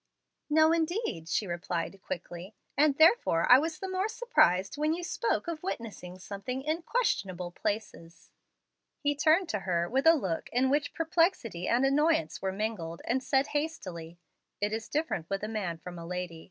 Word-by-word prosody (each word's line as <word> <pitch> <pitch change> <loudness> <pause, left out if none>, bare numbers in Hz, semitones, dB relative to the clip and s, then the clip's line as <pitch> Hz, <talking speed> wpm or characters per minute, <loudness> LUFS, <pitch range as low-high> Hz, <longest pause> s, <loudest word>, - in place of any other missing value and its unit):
"No, 315 +1 +5
indeed," 330 - -1
she 210 - 0
replied 175 +1 -4
quickly, 175 +3 -7 0.2
"and 285 0 +3
therefore 315 - +5
I 250 - +10
was 320 +2 -2
the 385 - -5
more 375 +2 0
surprised 200 - +2
when 305 +2 +1
you 350 - -6
spoke 450 +2 -1
of 330 -2 -4
witnessing 215 - -6
something 200 +7 -5
in 310 +3 -1
'questionable 190 - -1
places.'" 175 -4 -5 0.7
He 290 -1 0
turned 315 +5 +3
to 210 - -1
her 175 -2 0
with 270 - +1
a 325 - +8
look 190 - -3
in 260 +2 +2
which 285 0 0
perplexity 325 - +1
and 245 +3 +3
annoyance 275 - +2
were 190 - -1
mingled, 190 -5 -4
and 255 +3 0
said 270 +1 +2
hastily: 185 - -4 0.4
"It 205 +1 -1
is 225 0 -4
different 295 - -2
with 195 +1 -2
a - - -1
man 200 -7 -3
from 175 +2 -9
a 165 - -8
lady. 180 -2 -4
230 Hz, 170 wpm, -30 LUFS, -, 0.7 s, I